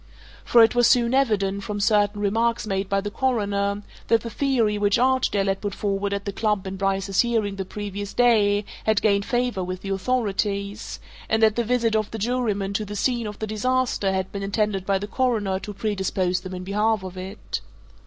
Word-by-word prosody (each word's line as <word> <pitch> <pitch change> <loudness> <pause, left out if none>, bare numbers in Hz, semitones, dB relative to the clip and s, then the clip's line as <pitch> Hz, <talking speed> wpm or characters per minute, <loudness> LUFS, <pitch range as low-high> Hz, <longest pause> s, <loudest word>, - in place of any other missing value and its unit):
For 235 -1 +6
it 225 - +4
was 240 -1 +4
soon 240 0 +3
evident, 200 -7 +1
from 205 +1 -4
certain 205 0 +2
remarks 230 +3 +1
made 195 -2 -2
by 195 0 +1
the 205 +1 -5
Coroner, 205 -5 0 0.2
that 230 -1 +3
the 230 - -6
theory 240 -7 +1
which 205 -1 +3
Archdale 255 -5 +2
had 195 0 -1
put 205 -2 -3
forward 200 -1 -1
at 200 0 -3
the 200 - -2
club 210 -1 0
in 190 0 -4
Bryce's 195 0 -1
hearing 225 -4 0
the 190 -1 -4
previous 205 0 -5
day 210 -4 +3 0.2
had 220 -1 +2
gained 200 -2 +3
favour 245 -6 0
with 185 0 -5
the 195 - -5
authorities, 200 -1 -2 0.3
and 220 0 +2
that 215 -1 +5
the 235 - +1
visit 230 -1 +1
of 215 -1 0
the 225 - -6
jurymen 215 -3 -1
to 215 - -1
the 205 0 -7
scene 235 +1 0
of 210 -1 -7
the 220 - -3
disaster 215 -1 0
had 190 0 -2
been 200 - -5
intended 200 -1 -1
by 195 -1 +3
the 200 - -4
Coroner 210 -5 0
to 210 - -7
predispose 190 -3 -1
them 185 0 -7
in 180 - -6
behalf 210 +2 0
of 185 0 -7
it. 190 +3 -6
205 Hz, 205 wpm, -24 LUFS, 195-225 Hz, 0.3 s, For